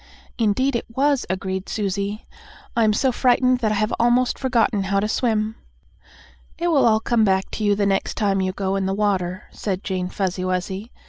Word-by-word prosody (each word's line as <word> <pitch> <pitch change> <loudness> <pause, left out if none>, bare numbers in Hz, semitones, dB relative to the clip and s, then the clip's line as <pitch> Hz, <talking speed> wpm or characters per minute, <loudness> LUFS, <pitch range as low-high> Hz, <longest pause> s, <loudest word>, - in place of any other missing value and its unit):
"Indeed 240 +5 +1
it 235 - -2
was," 275 +3 +1
agreed 190 +1 -3
Susie. 200 0 -3 0.5
"I'm 220 -2 +3
so 255 +5 +2
frightened 250 0 +3
that 220 -3 0
I - - +1
have 215 +2 0
almost 240 +1 +2
forgotten 235 -6 +1
how 195 +1 +1
to 210 - 0
swim." 220 -1 0 1.0
"It 345 - 0
will 290 -7 +4
all 220 -1 +4
come 225 0 +1
back 190 -2 +1
to 215 - -4
you 205 -1 +3
the 200 0 0
next 195 -1 0
time 195 -2 +1
you 185 0 0
go 195 0 -2
in 195 -1 -1
the 195 - -1
water," 190 -3 -1
said 195 -2 -4
Jane 185 -2 -2
Fuzzy 185 -2 -2
Wuzzy. 185 +4 -3
210 Hz, 190 wpm, -22 LUFS, 195-235 Hz, 1.0 s, will